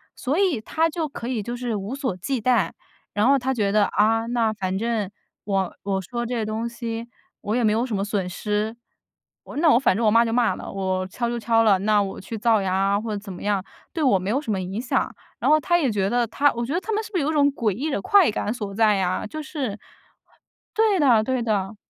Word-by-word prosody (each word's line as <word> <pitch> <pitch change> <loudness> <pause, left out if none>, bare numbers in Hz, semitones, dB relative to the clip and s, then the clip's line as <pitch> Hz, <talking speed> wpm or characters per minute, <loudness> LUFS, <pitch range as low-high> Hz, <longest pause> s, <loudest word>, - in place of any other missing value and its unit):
所 285 +8 -1
以 360 - +2
他 325 +8 0
就 320 -1 -2
可 240 -4 -7
以 235 -5 -2
就 240 +3 -4
是 240 -3 -3
无 200 +5 -4
所 260 -10 -3
忌 240 +6 -2
惮， 250 +1 +2 0.4
然 210 +4 +2
后 275 0 +5
他 265 +1 -1
觉 205 -4 0
得， 210 -1 +4
啊， 225 +3 +2
那 230 -2 +1
反 190 -2 -3
正 220 -1 -1 0.4
我 195 -3 0
我 195 -1 -1
说 240 +5 -4
这 250 - -4
些 230 -2 -1
东 220 +2 -2
西， 235 -1 -5 0.3
我 215 +3 -2
也 245 - +1
没 215 - +4
有 230 +3 +1
什 225 -5 -3
么 195 - -1
损 200 -3 -2
失。 210 +4 -2 0.7
我 - - -9
那 325 +1 +3
我 235 - +5
反 230 - +3
正 230 - 0
我 210 - +5
骂 230 +1 +6
就 225 - -2
骂 235 -1 +2
了， - - -8
我 185 -1 -2
敲 235 +5 -3
就 235 0 -2
敲 225 0 +3
了， 200 -4 +4
那 205 0 +3
我 195 - -6
去 225 +3 -6
造 220 -1 +3
谣 190 -1 -1
啊 195 +2 +1
或 225 - -5
者 205 - -2
怎 200 -2 -8
么 - - -10
样， 200 -2 0 0.3
对 320 -3 -1
我 200 -8 +4
没 190 +2 -4
有 265 +6 +1
什 280 -8 -4
么 190 -2 -1
影 190 +4 -4
响。 250 - 0 0.3
然 - - +1
后 310 0 +6
他 345 +3 +2
也 270 -7 +1
觉 195 -2 0
得 240 -1 +1
他 285 +5 +2
我 235 - -3
觉 255 - -4
得 350 - +1
他 440 - -5
们 435 +1 0
是 435 - -10
不 370 - -1
是 300 - +1
有 305 - 0
种 285 -1 +4
诡 225 -6 0
异 270 +11 -3
的 275 - -1
快 395 - +5
感 210 +1 -2
所 205 -5 -6
在 215 -1 +4
呀， 185 -1 -1
就 310 +8 -6
是 265 -9 -4 1.0
对 430 -4 +3
的 240 -7 +5
对 255 0 -1
的。 210 -2 -1
225 Hz, 275 characters per minute, -23 LUFS, 205-255 Hz, 1.0 s, 骂